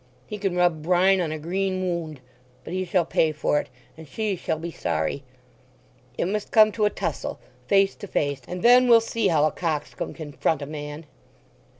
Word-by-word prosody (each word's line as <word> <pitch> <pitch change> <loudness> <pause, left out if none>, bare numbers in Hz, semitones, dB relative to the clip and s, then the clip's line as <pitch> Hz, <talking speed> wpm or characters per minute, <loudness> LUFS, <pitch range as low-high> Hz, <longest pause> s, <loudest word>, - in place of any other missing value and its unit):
He 210 - -7
can 195 -3 -1
rub 175 -3 +2
brine 185 +3 +3
on 165 -3 -2
a 155 - -3
green 185 +4 -2
wound!... 165 -6 -3 0.4
But - - -7
he 185 0 -1
shall 175 -1 +1
pay 160 -1 +2
for 150 -1 0
it, - - -7 0.3
and 160 0 -12
she 215 +5 -2
shall 160 - -2
be 170 +2 -6
sorry. 80 - -2 1.0
It - - 0
must 205 +3 -2
come 215 -1 +6
to 215 0 0
a - - +4
tussle—face 195 -1 -1
to 205 - -8
face; 145 -6 -1
and 180 0 -6
then 250 +1 +7
we'll 235 -1 +8
see 225 -1 -1
how 155 -4 +3
a 155 - +1
coxcomb 155 -4 -3
can 155 -3 -8
front 150 +1 0
a - - -4
man!" 150 +1 -7
175 Hz, 195 wpm, -24 LUFS, 155-195 Hz, 1.0 s, we'll